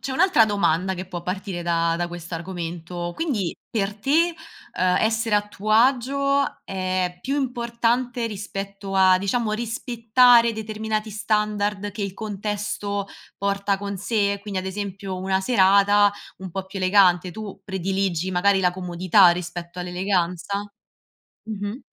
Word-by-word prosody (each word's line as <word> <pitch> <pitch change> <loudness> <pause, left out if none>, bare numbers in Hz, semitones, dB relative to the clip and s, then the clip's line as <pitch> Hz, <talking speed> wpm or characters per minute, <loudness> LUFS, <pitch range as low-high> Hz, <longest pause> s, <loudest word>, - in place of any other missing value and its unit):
c'è 265 - -2
un'altra 345 -5 +5
domanda 190 -3 +1
che 185 +1 -6
può 175 -2 -6
partire 185 0 -4
da 170 -1 +1
da 175 0 -2
quest'argomento, 175 0 -6
quindi 235 - -2
per 205 -2 -1
te, 285 +11 +2 0.4
ehm, 180 0 +2
essere 225 0 +1
a 205 0 +2
tuo 210 +1 -5
agio 275 +4 +2
è 185 -1 -2
più 275 +8 -2
importante 240 -1 -1
rispetto 200 -1 -6
a, 185 -1 +5
diciamo, 215 +3 -1
rispettare 235 +1 +3
determinati 220 0 -3
standard 210 -1 -1
che 205 +1 -5
il 195 -2 -4
contesto 205 -1 -3 0.3
porta 200 0 0
con 200 0 -5
sé: 200 0 0
quindi 200 -2 -4
ad 185 - -7
esempio, 195 0 -5
una 190 +1 0
serata 200 -1 +4 0.3
un 190 -1 -7
po' 190 +2 -4
più 195 +1 -7
elegante, 185 -2 +4
tu 205 0 -8
prediligi 190 -2 -1
magari 190 +2 +3
la 180 -1 +2
comodità 180 +1 +4
rispetto 175 0 -5
all'eleganza? 180 +1 -1 0.8
Mh-mh. 210 +1 -5
200 Hz, 135 wpm, -23 LUFS, 185-220 Hz, 0.8 s, un'altra